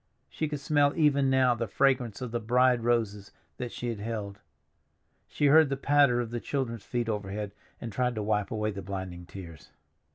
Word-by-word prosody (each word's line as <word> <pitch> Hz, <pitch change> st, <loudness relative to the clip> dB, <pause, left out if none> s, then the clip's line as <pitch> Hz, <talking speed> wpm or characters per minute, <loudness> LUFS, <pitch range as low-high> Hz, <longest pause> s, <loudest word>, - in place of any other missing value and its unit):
She 155 Hz, -, -2 dB
could 150 Hz, -1 st, -4 dB
smell 145 Hz, 0 st, +2 dB
even 140 Hz, -4 st, +3 dB
now 130 Hz, -2 st, +4 dB
the 115 Hz, -1 st, -3 dB
fragrance 125 Hz, -1 st, +1 dB
of 125 Hz, -, -5 dB
the 120 Hz, -, -1 dB
bride 125 Hz, +1 st, +3 dB
roses 110 Hz, -4 st, 0 dB, 0.3 s
that 120 Hz, -2 st, -5 dB
she 120 Hz, -, -4 dB
had 115 Hz, -3 st, -4 dB
held. 105 Hz, -2 st, -5 dB, 0.9 s
She 145 Hz, -, -1 dB
heard 155 Hz, +1 st, +6 dB
the 135 Hz, -, -1 dB
patter 140 Hz, -3 st, +4 dB
of 120 Hz, -2 st, -3 dB
the 120 Hz, -, -2 dB
children's 115 Hz, -5 st, -3 dB
feet 120 Hz, +1 st, -2 dB
overhead, 105 Hz, -1 st, -3 dB, 0.3 s
and 115 Hz, -, -6 dB
tried 125 Hz, +3 st, 0 dB
to 105 Hz, -, -2 dB
wipe 105 Hz, -1 st, 0 dB
away 110 Hz, -1 st, -1 dB
the 100 Hz, -1 st, -6 dB
blinding 95 Hz, -3 st, -6 dB
tears. 85 Hz, -6 st, -11 dB
120 Hz, 190 wpm, -28 LUFS, 105-130 Hz, 0.9 s, heard